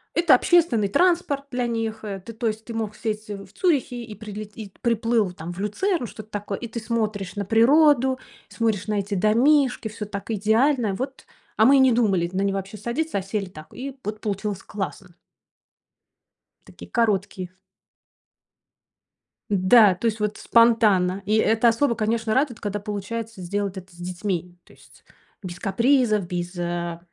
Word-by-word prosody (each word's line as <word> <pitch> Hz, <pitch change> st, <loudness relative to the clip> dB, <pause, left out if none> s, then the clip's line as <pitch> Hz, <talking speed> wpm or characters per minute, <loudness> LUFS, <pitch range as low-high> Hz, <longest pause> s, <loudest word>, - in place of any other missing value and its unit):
это 335 Hz, -5 st, +6 dB
общественный 250 Hz, -, +3 dB
транспорт 335 Hz, -, +2 dB
для 245 Hz, -1 st, -1 dB
них, 225 Hz, -1 st, -3 dB
э, 200 Hz, -2 st, -5 dB
ты, 230 Hz, -, -8 dB
то 225 Hz, +1 st, -2 dB
есть 220 Hz, 0 st, -3 dB
ты 235 Hz, -, -7 dB
мог 220 Hz, -2 st, -3 dB
сесть, 215 Hz, -1 st, -4 dB
э, 205 Hz, -, -4 dB
в 195 Hz, -1 st, -13 dB
Цюрихе 265 Hz, -9 st, 0 dB
и 220 Hz, -, -9 dB
прилет 210 Hz, 0 st, -9 dB
и 205 Hz, -4 st, -8 dB
приплыл 230 Hz, -3 st, +1 dB
там 175 Hz, 0 st, -7 dB
в 175 Hz, -, -10 dB
Люцерн 250 Hz, -, -1 dB
что-то 215 Hz, 0 st, -11 dB
такое: 205 Hz, -1 st, -4 dB
и 240 Hz, -, -5 dB
ты 235 Hz, +1 st, -5 dB
смотришь 215 Hz, -4 st, -2 dB
на 200 Hz, -, -2 dB
природу, 260 Hz, +4 st, +4 dB, 0.3 s
и -, -, -16 dB
смотришь 220 Hz, -4 st, -1 dB
на 210 Hz, -1 st, 0 dB
эти 200 Hz, +1 st, -4 dB
домишки, 245 Hz, +6 st, +3 dB
всё 215 Hz, 0 st, -6 dB
так 200 Hz, +1 st, -7 dB
идеально, 220 Hz, +2 st, +2 dB
вот. 265 Hz, +5 st, -6 dB, 0.3 s
А 220 Hz, -, +5 dB
мы 275 Hz, +3 st, +7 dB
и -, -, +5 dB
не 265 Hz, -1 st, +6 dB
думали 195 Hz, -7 st, +2 dB
на 190 Hz, -, 0 dB
него 195 Hz, 0 st, 0 dB
вообще 195 Hz, +2 st, -6 dB
садиться, 240 Hz, +7 st, -2 dB
а -, -, -4 dB
сели 195 Hz, +1 st, -3 dB
так. 155 Hz, -4 st, -12 dB
И 270 Hz, +1 st, -7 dB
вот 210 Hz, +1 st, -4 dB
получилось 200 Hz, -2 st, -3 dB
классно. 195 Hz, -2 st, -6 dB, 1.6 s
Такие -, -, -13 dB
короткие. 195 Hz, -5 st, -1 dB, 1.9 s
Да, 200 Hz, 0 st, +6 dB
то 210 Hz, -, -6 dB
есть 220 Hz, 0 st, -1 dB
вот 210 Hz, 0 st, -1 dB
спонтанно. 210 Hz, -5 st, +3 dB
И 210 Hz, +2 st, +1 dB
это 225 Hz, +2 st, +4 dB
особо, 235 Hz, +1 st, +1 dB
конечно, 220 Hz, 0 st, 0 dB
радует, 260 Hz, -2 st, +1 dB
когда 205 Hz, 0 st, -3 dB
получается 210 Hz, +1 st, -5 dB
сделать 200 Hz, +2 st, -3 dB
это 185 Hz, 0 st, -10 dB
с -, -, -18 dB
детьми. 180 Hz, 0 st, -4 dB
То -, -, -19 dB
есть -, -, -21 dB, 0.4 s
без 180 Hz, -3 st, -7 dB
капризов, 220 Hz, -1 st, +2 dB
без, 175 Hz, +1 st, -4 dB
э, 170 Hz, -1 st, -3 dB
215 Hz, 175 wpm, -24 LUFS, 195-235 Hz, 1.9 s, мы